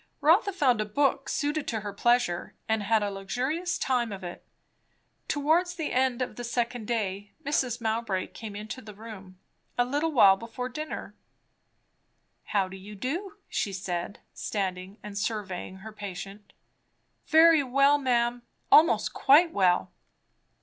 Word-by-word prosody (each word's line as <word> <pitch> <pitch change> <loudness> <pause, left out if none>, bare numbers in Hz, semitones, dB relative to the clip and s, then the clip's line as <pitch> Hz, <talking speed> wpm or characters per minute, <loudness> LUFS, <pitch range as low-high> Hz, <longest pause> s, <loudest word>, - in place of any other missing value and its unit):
Rotha 360 +7 +4
found 260 - +2
a - - -1
book 275 +5 0
suited 295 0 -1
to 220 -2 -2
her 205 -1 -5
pleasure, 240 -5 +1
and 220 -1 +1
had 215 +1 +2
a 205 - -1
luxurious 260 - -2
time 245 -4 0
of 195 -1 -7
it. 175 -1 -7 0.8
Towards 325 +5 +1
the 320 -3 -3
end 255 -1 +2
of 250 - -7
the 245 - -5
second 240 -1 -2
day, 205 -3 -2
Mrs. 255 -4 0
Mowbray 220 -4 -1
came 215 -3 -8
into 215 +5 -6
the 210 -3 -11
room; 200 -4 -11 0.4
a 245 - +3
little 290 +5 0
while 200 -8 +6
before 235 +3 -6
dinner. 305 +4 -6 1.3
"How 195 -2 +1
do 190 +1 -9
you 205 +2 -10
do?" 350 - -4
she 205 - -2
said, 185 0 -4
standing 190 -1 -4
and 210 -1 -8
surveying 200 -3 -3
her 220 - -7
patient. 200 0 -8 0.7
"Very 320 0 +7
well, 275 +2 +3
ma'am; 240 -2 +1 0.3
almost 315 +2 +5
quite 320 +5 +5
well." 180 -2 +2
230 Hz, 145 wpm, -28 LUFS, 200-275 Hz, 1.3 s, Very